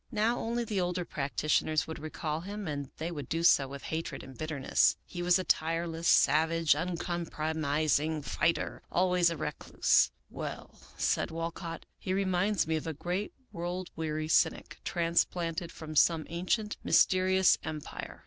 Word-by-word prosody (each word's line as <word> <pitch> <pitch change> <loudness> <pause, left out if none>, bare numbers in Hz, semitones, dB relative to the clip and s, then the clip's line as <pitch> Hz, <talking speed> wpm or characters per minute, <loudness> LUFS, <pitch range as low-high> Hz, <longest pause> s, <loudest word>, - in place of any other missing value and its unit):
Now 225 +3 +1
only 235 +1 -1
the 210 -4 -1
older 180 0 -1
practitioners 155 +1 0
would 160 - -7
recall 155 0 -4
him, 200 +1 -6
and 145 -3 -4
they 165 +2 -3
would 145 -6 -6
do 165 +1 -1
so 140 -5 +5
with 140 +1 -8
hatred 160 +1 -4
and 130 0 -11
bitterness. 155 -1 +2
He 175 - -6
was 175 +1 +4
a 185 - -2
tireless, 165 0 0
savage, 160 0 +4
un 175 +3 -2
compromising 155 -3 -1
fighter, 170 +3 0
always 180 -1 +3
a 165 - -4
recluse." 150 - +2
" - - -44
Well," - - -7 0.2
said - - +1
Walcott, 165 +1 -5
" - - -47
he 185 - -2
reminds 195 +1 +1
me 160 0 0
of 155 - -5
a 160 - -2
great 180 +7 -3 0.2
world 175 +2 -4
weary 155 -1 -2
cynic, 155 0 +1
transplanted 170 0 0
from 155 -1 -8
some 160 +1 +4
ancient 185 +6 -1
mysterious 185 0 +4
em 160 -1 -4
pire. - - -8
165 Hz, 160 wpm, -30 LUFS, 155-180 Hz, 0.2 s, so